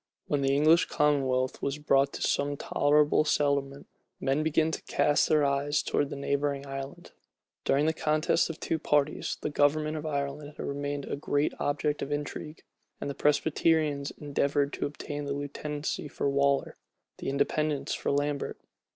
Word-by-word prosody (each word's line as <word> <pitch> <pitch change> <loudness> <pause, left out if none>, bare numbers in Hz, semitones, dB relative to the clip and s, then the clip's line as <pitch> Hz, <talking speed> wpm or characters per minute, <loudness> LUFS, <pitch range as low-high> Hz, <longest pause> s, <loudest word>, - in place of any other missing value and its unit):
When 145 -1 0
the 135 0 +2
English 155 +4 +5
commonwealth 135 -4 +1
was 140 +1 -1
brought 140 -2 +2
to - - -4
some 145 0 0
tolerable 150 +2 +3
settlement, 140 -2 0 0.3
men 135 +3 +1
began 160 +1 +2
to - - -4
cast 145 0 +2
their 150 -2 +4
eyes 140 +1 +1
towards 145 - 0
the - - -5
neighboring 140 0 -1
island. 135 0 -7 0.5
During 140 +2 +3
the 160 - +2
contest 155 +2 +1
of 165 - -4
the - - -6
two 160 - 0
parties, 150 -1 0
the 150 - -2
government 150 +2 +2
of 155 +1 -5
Ireland 145 0 -3
had - - -5
remained 145 0 -3
a - - -3
great 145 0 0
object 145 +1 -1
of 140 - -4
intrigue; 150 +1 -5 0.4
and 140 - -3
the - - -5
Presbyterians 150 0 +1
endeavored 145 0 0
to - - -1
obtain 145 0 -6
the 140 - -2
lieutenancy 145 +1 -4
for 140 - -2
Waller, 140 0 +1 0.4
the - - -3
Independents 145 +1 0
for - - -2
Lambert. 145 0 -1
145 Hz, 165 wpm, -29 LUFS, 140-150 Hz, 0.5 s, English